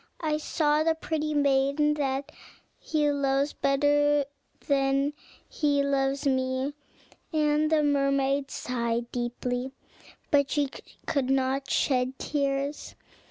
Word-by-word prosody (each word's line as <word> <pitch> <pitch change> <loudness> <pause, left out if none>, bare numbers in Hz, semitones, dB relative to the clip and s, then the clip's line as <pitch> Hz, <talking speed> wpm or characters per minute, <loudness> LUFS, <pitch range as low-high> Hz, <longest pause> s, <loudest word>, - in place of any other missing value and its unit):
I 305 -2 0
saw 300 -1 +1
the 320 0 +2
pretty 310 -1 -2
maiden 280 +1 +2
that 280 0 -2 0.5
he 300 -2 0
loves 280 0 0
better 290 +1 +2 0.4
than 275 0 +2 0.3
he 285 -2 +1
loves 275 0 0
me;" 260 +1 0 0.6
and 305 0 +2
the 310 -1 +3
mermaid 275 -1 +1
sighed 235 -1 -2
deeply, 245 +1 -3 0.6
but 280 -1 +3
she 285 -3 0 0.3
could 275 -4 0
not 270 0 0
shed 255 -1 +1
tears. 280 0 -2
280 Hz, 110 wpm, -27 LUFS, 270-295 Hz, 0.6 s, the